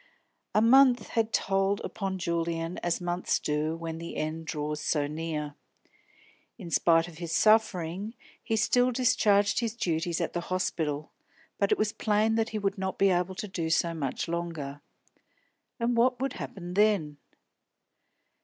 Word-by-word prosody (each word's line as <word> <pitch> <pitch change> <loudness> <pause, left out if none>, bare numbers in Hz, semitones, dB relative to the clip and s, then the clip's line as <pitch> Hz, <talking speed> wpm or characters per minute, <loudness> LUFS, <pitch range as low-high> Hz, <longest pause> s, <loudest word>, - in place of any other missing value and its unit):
A 215 - +5
month 255 +1 +5
had 225 -1 0
told 195 0 +1
upon 195 -2 -4
Julian 170 -1 -2
as 175 -1 -1
months 175 0 -1
do 150 +2 -1
when 165 -1 -5
the 170 - -7
end 160 +1 -3
draws 150 0 -3
so 150 -1 0
near. 150 -1 -4 1.0
In 180 -7 -9
spite 165 0 +4
of 170 -2 -12
his 170 -2 -5
suffering 205 +1 +2 0.3
he 225 - -1
still 245 +3 +3
discharged 210 -5 +3
his 230 -1 -2
duties 170 -5 -1
at - - -2
the 175 - -2
hospital, 155 -5 -2 0.5
but 200 - +1
it - - +4
was 215 0 0
plain 215 +1 +1
that 225 0 +1
he 220 - -3
would 200 -1 -1
not 190 0 -3
be 195 -1 +4
able 180 +1 0
to 210 - -5
do 170 -4 -3
so 165 +1 +2
much 145 -2 -3
longer. 165 -5 -4 1.0
And 235 +1 +1
what 245 +1 +3
would 270 0 -1
happen 175 -2 -7
then? 195 -8 +2
180 Hz, 155 wpm, -28 LUFS, 165-215 Hz, 1.0 s, A